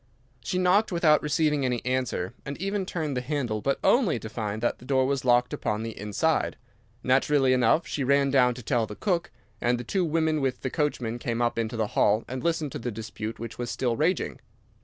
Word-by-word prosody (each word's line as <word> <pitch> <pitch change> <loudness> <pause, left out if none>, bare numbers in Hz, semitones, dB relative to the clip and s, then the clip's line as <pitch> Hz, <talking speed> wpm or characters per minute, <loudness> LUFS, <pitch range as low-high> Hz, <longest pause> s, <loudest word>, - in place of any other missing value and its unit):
She 180 - -2
knocked 185 +4 +3
without 160 -4 +4
receiving 150 -1 +1
any 125 -2 -1
answer, 125 -8 -1
and 140 0 -6
even 195 +1 -2
turned 155 -5 -2
the 125 - -1
handle, 125 -6 -2
but 135 +3 0
only 235 - +3
to 110 - -7
find 110 -2 -3
that 120 - 0
the - - -15
door 130 -1 +2
was 135 -1 -1
locked 125 0 +3
upon 105 +1 -2
the 115 0 -5
inside. 105 -1 0 0.5
Naturally 135 +1 +3
enough 130 +6 +3
she 145 - -3
ran 140 +1 +3
down 125 -3 +4
to 125 - -9
tell 115 0 +1
the 105 - -8
cook, 175 - -1 0.3
and 120 +1 +2
the - - -4
two 185 - 0
women 160 -2 +1
with 135 -2 -1
the 130 - -3
coachman 120 -6 -1
came 115 0 -2
up 120 -1 0
into 115 0 -2
the 110 -2 0
hall 105 +2 +3
and 130 +1 -5
listened 165 -4 0
to - - -5
the 120 - -3
dispute 110 0 -6
which 115 +1 -8
was 120 -1 -3
still 120 -1 -1
raging. 165 +8 0
130 Hz, 215 wpm, -27 LUFS, 115-150 Hz, 0.5 s, without